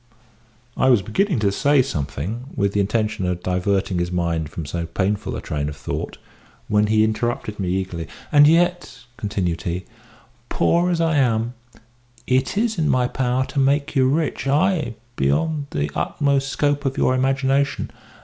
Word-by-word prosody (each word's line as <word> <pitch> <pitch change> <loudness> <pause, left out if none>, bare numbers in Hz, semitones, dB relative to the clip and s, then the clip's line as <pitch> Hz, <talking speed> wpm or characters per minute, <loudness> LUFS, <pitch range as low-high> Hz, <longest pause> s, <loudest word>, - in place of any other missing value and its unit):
I 130 - +3
was 120 -6 +4
beginning 170 - 0
to 100 -2 +2
say 140 +6 +3
something, 100 - -4
with 100 0 0
the 105 - +1
intention 105 -2 0
of 90 0 -3
diverting 95 0 0
his 85 0 -1
mind 85 -3 -1
from 80 0 -6
so 85 +3 -4
painful 100 +4 -1
a - - -5
train 75 -1 -3
of 75 - -8
thought, - - -5 0.5
when 105 0 +2
he 110 0 +3
interrupted 110 -1 -2
me 95 -2 -1
eagerly. 90 -3 -2 0.2
"And 145 -1 +7
yet," 175 -4 +2
continued 90 -6 -2
he, 90 +2 -3 0.6
"poor 170 - +2
as 175 -2 0
I 165 -2 +2
am, 120 -3 +1 0.7
it 130 +8 +1
is 220 -3 +1
in 155 - +1
my 125 -1 +2
power 130 0 0
to 140 - -3
make 140 +2 +1
you 130 -1 +4
rich 150 -1 -1
ay, 150 - +1 0.2
beyond 140 - 0
the 75 0 -2
utmost 140 -1 0
scope 145 +1 0
of 135 -1 -2
your 130 - +3
imagination. 135 +2 +1
120 Hz, 165 wpm, -22 LUFS, 95-140 Hz, 0.7 s, And